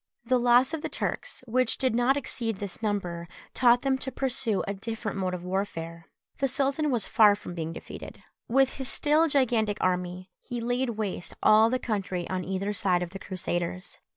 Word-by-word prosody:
The 255 Hz, +1 st, +3 dB
loss 245 Hz, +4 st, +4 dB
of 320 Hz, -, -2 dB
the -, -, -3 dB
Turks, -, -, -4 dB
which 250 Hz, 0 st, +2 dB
did 260 Hz, -3 st, +1 dB
not 245 Hz, +4 st, +3 dB
exceed 230 Hz, -5 st, -2 dB
this 200 Hz, +1 st, -7 dB
number, 180 Hz, -6 st, -2 dB, 0.3 s
taught 245 Hz, -1 st, +5 dB
them 265 Hz, -1 st, +1 dB
to 265 Hz, -, -3 dB
pursue 255 Hz, -6 st, 0 dB
a 200 Hz, -, -1 dB
different 220 Hz, 0 st, -4 dB
mode 185 Hz, -1 st, -1 dB
of 175 Hz, -, -8 dB
warfare. 170 Hz, -3 st, -4 dB, 0.3 s
The 275 Hz, -, +2 dB
sultan 275 Hz, +3 st, +1 dB
was 240 Hz, -6 st, 0 dB
far 210 Hz, -2 st, +5 dB
from 205 Hz, -3 st, -8 dB
being 165 Hz, -2 st, -4 dB
defeated. 165 Hz, -, -9 dB, 0.2 s
With 265 Hz, +2 st, +2 dB
his 265 Hz, -1 st, -1 dB
still 305 Hz, +2 st, +3 dB
gigantic 235 Hz, -7 st, +2 dB
army, 180 Hz, 0 st, -1 dB
he 245 Hz, -2 st, -5 dB
laid 245 Hz, +2 st, 0 dB
waste 195 Hz, -5 st, -4 dB
all 220 Hz, +1 st, +6 dB
the 255 Hz, -, +1 dB
country 195 Hz, -7 st, -3 dB
on 185 Hz, -1 st, -1 dB
either 190 Hz, +3 st, -2 dB
side 185 Hz, -4 st, +1 dB
of 175 Hz, -, -7 dB
the 195 Hz, -, -7 dB
Crusaders. 180 Hz, -1 st, -4 dB
220 Hz, 185 wpm, -27 LUFS, 185-255 Hz, 0.3 s, all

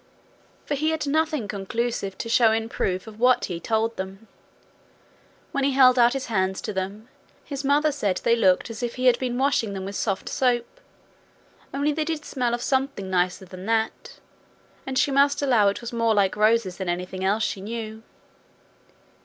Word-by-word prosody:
For -, -, -2 dB
he 305 Hz, +3 st, 0 dB
had 320 Hz, -1 st, -1 dB
nothing 305 Hz, -4 st, 0 dB
conclusive 200 Hz, 0 st, -3 dB
to -, -, -5 dB
show 230 Hz, -1 st, +4 dB
in 225 Hz, 0 st, -1 dB
proof 185 Hz, -5 st, -2 dB
of 220 Hz, -1 st, -12 dB
what 250 Hz, +1 st, +4 dB
he 175 Hz, -3 st, -5 dB
told 225 Hz, +3 st, -1 dB
them. 195 Hz, +3 st, -7 dB, 1.2 s
When 275 Hz, -, -1 dB
he 275 Hz, 0 st, +2 dB
held 255 Hz, -1 st, +6 dB
out 240 Hz, 0 st, +5 dB
his 270 Hz, -1 st, -3 dB
hands 190 Hz, -4 st, 0 dB
to 210 Hz, -, -4 dB
them, 195 Hz, +4 st, -4 dB, 0.4 s
his 280 Hz, -1 st, -5 dB
mother 290 Hz, +2 st, +3 dB
said 205 Hz, -10 st, -1 dB
they 235 Hz, -, +4 dB
looked 195 Hz, 0 st, +2 dB
as 220 Hz, -, -7 dB
if 240 Hz, -1 st, -3 dB
he 255 Hz, 0 st, -3 dB
had 245 Hz, -2 st, +5 dB
been 245 Hz, -2 st, -2 dB
washing 255 Hz, -6 st, +1 dB
them 190 Hz, -1 st, -5 dB
with 200 Hz, +1 st, -6 dB
soft 195 Hz, -3 st, -2 dB
soap, 250 Hz, -, -1 dB, 0.9 s
only 285 Hz, +2 st, 0 dB
they 310 Hz, +1 st, -1 dB
did 315 Hz, -2 st, -3 dB
smell 245 Hz, -3 st, -1 dB
of 240 Hz, -, -6 dB
something 265 Hz, -8 st, -1 dB
nicer 180 Hz, +1 st, 0 dB
than 185 Hz, +1 st, -10 dB
that, 225 Hz, -1 st, -1 dB, 0.7 s
and 265 Hz, -1 st, -2 dB
she 280 Hz, -, +3 dB
must 280 Hz, +1 st, +3 dB
allow 240 Hz, -7 st, +4 dB
it 200 Hz, -, 0 dB
was 235 Hz, 0 st, -7 dB
more 230 Hz, -1 st, +2 dB
like 195 Hz, -2 st, +2 dB
roses 215 Hz, -3 st, +2 dB
than 190 Hz, -2 st, -3 dB
anything 180 Hz, +2 st, -3 dB
else 205 Hz, +3 st, +1 dB
she 195 Hz, -, -2 dB
knew. 220 Hz, +1 st, -6 dB
230 Hz, 185 wpm, -24 LUFS, 195-265 Hz, 1.2 s, held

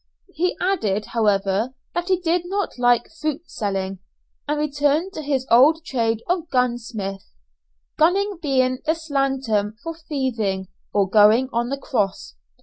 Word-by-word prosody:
He 360 Hz, +3 st, 0 dB
added, 215 Hz, -, 0 dB
however, 210 Hz, +2 st, +1 dB, 0.2 s
that 350 Hz, 0 st, -2 dB
he 370 Hz, -2 st, +2 dB
did 350 Hz, 0 st, +1 dB
not 390 Hz, -6 st, -3 dB
like 245 Hz, -1 st, +3 dB
fruit 310 Hz, +1 st, -2 dB
selling, 195 Hz, -2 st, -3 dB, 0.5 s
and 295 Hz, +1 st, 0 dB
returned 295 Hz, +4 st, +1 dB
to -, -, -5 dB
his 275 Hz, -3 st, -1 dB
old 305 Hz, +7 st, +6 dB
trade 230 Hz, -5 st, -1 dB
of 345 Hz, -2 st, -1 dB
"gunsmith," 230 Hz, -6 st, -2 dB, 0.7 s
gunning 385 Hz, +4 st, +2 dB
being 255 Hz, -4 st, +1 dB
the 315 Hz, -, +3 dB
slang 275 Hz, -4 st, -1 dB
term 210 Hz, -3 st, 0 dB
for 330 Hz, 0 st, -5 dB
thieving, 235 Hz, -, -2 dB, 0.2 s
or 200 Hz, -2 st, +2 dB
going 215 Hz, +6 st, +5 dB
on 240 Hz, +1 st, 0 dB
the 275 Hz, -, -2 dB
cross. 205 Hz, -, -2 dB
260 Hz, 145 wpm, -22 LUFS, 215-315 Hz, 0.7 s, old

